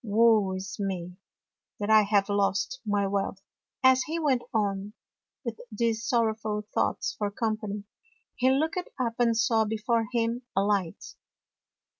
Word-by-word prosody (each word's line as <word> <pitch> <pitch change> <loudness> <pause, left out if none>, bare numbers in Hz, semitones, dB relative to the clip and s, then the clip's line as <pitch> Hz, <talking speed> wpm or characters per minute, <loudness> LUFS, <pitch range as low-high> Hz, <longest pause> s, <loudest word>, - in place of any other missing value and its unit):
Woe 215 -2 +4
is 190 +2 -6
me, 180 -3 -3 0.6
that 210 +1 -1
I 215 0 +8
have 205 -1 +2
lost 205 - 0
my 205 -1 +1
wealth! 195 0 -2 0.2
" - - -57
As 260 0 +6
he 315 +4 -3
went 275 -6 +2
on, 205 -1 -1 0.5
with 230 -1 -4
these 225 +1 0
sorrowful 220 -3 0
thoughts - - 0
for 205 -1 0
company, 215 -1 -3 0.5
he 260 +1 +3
looked 315 +7 +1 0.2
up 235 -3 0
and 230 -2 +3
saw 225 0 +3
before 220 +1 0
him 235 0 0
a 195 - +3
light. 200 -5 0
215 Hz, 145 wpm, -28 LUFS, 200-235 Hz, 0.6 s, I